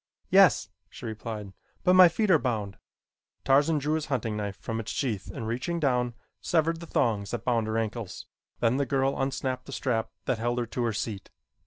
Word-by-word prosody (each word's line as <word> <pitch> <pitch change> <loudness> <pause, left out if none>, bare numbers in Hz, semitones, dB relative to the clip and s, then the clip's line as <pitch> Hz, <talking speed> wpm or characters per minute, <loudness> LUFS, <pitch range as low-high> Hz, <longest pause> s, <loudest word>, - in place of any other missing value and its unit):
"Yes," - - +6 0.2
she - - -10
replied, 110 -3 -6 0.3
"but 180 - +5
my 185 -1 +9
feet 210 +3 +1
are 160 - +6
bound." 110 -7 -2 0.7
Tarzan 145 +4 +4
drew 150 +2 0
his 155 -1 -1
hunting 115 -6 -1
knife 100 -2 -3
from 115 0 -4
its 115 - -5
sheath 110 -9 -2
and 115 -5 -5
reaching 125 +9 -2
down, 125 -5 +1 0.3
severed 165 0 +1
the 170 - -9
thongs 105 -8 0
that 120 - -4
bound 115 -3 +1
her 110 +1 -1
ankles. 110 -2 -4 0.4
Then 115 +2 +3
the 140 -1 0
girl 135 0 +1
unsnapped 130 -1 -2
the - - -8
strap 120 -5 -1 0.2
that 115 - 0
held 120 +1 -1
her 120 - 0
to 120 +2 -3
her 115 - 0
seat. 105 -2 -4
120 Hz, 195 wpm, -28 LUFS, 110-140 Hz, 0.7 s, my